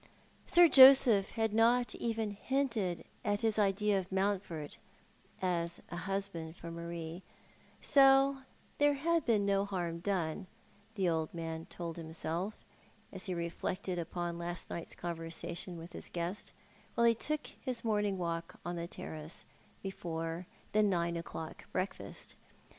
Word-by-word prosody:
Sir 345 0 +8
Joseph 260 -8 +8
had 220 -1 0
not 240 +2 +4
even 225 -2 -1
hinted 215 -5 -1 0.2
at 205 -2 +1
his 220 -1 +2
idea 200 0 +3
of 185 0 -7
Mountford 190 -6 -1 0.7
as 170 -2 0
a - - -4
husband 190 -3 -3
for 170 -2 -8
Marie; 170 0 -6 0.6
so 270 0 +6 0.4
there 290 0 +5
had 330 +2 +1
been 215 -4 +3
no 200 0 +3
harm 175 -4 -3
done, 180 -1 -1 0.5
the 190 -3 +1
old 160 -2 0
man 165 -1 -4
told 170 -1 -6
himself, 165 +4 -3 0.6
as 190 -1 -4
he 185 - -2
reflected 175 +2 -3
upon 170 0 -3
last 175 +1 -5
night's 170 - -5
conversation 170 +1 -4
with 165 +1 -9
his - - -4
guest, 175 +4 -4 0.4
while 235 - +4
he 230 - +7
took 300 +6 -2
his 255 -3 -4
morning 210 -3 +1
walk 170 -1 -3
on 175 0 -3
the 170 0 -3
terrace^ 155 0 -8 0.4
before 165 -2 -4 0.2
the 215 - +4
nine 170 -4 +2
o'clock 165 -1 -6
breakfast. 185 +2 -4
185 Hz, 135 wpm, -33 LUFS, 170-215 Hz, 0.7 s, Sir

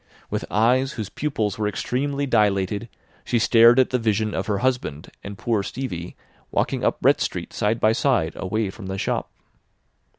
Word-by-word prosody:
With - - -2
eyes 125 +6 +2
whose 110 -5 -5
pupils 110 -9 -2
were 105 - +1
extremely 140 +7 -2
dilated 105 -2 +1 0.3
she 120 - 0
stared 115 +1 +6
at 130 - +3
the 125 - +1
vision 110 -1 0
of - - -2
her 105 -2 0
husband 120 - -2
and 100 0 -7
poor 110 -1 0
Stevie 100 -7 -5 0.3
walking - - -1
up - - 0
Brett - - +4
Street - - -3
side 110 +2 0
by 110 - +4
side 115 - +1
away 100 +1 -2
from 95 -1 -10
the 95 0 -4
shop. - - -2
110 Hz, 170 wpm, -23 LUFS, 100-125 Hz, 0.3 s, stared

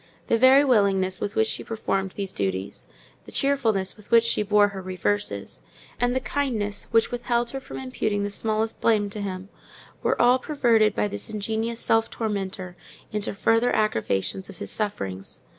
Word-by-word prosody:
The 230 - +4
very 265 +3 +7
willingness 195 -6 +2
with 205 - -3
which 220 - +3
she - - -3
performed 195 -4 -2
these 195 -2 -4
duties, 95 -1 -3 0.4
the - - -11
cheerfulness 225 -9 +1
with 210 -1 -18
which 230 -1 +6
she 230 - +1
bore 205 0 +4
her 195 -1 -7
reverses, 185 - -3 0.4
and 245 +1 +1
the - - +2
kindness 235 -7 -2
which 225 +1 +3
withheld 240 -1 -1
her 270 - -4
from - - -9
imputing 235 -6 -2
the 205 - -2
smallest 220 +1 -1
blame 210 -3 +2
to 210 - -4
him, 190 -1 -5 0.5
were - - 0
all 245 +2 +5
perverted 235 -7 +2
by - - +1
this 205 - -6
ingenious 220 +2 -2
self 225 0 +2
tormentor 195 -4 -4 0.4
into 210 -1 -2
further 225 +4 +2
aggravations 190 - 0
of 195 - -11
his - - -5
sufferings. 95 - -4
210 Hz, 170 wpm, -25 LUFS, 195-235 Hz, 0.5 s, very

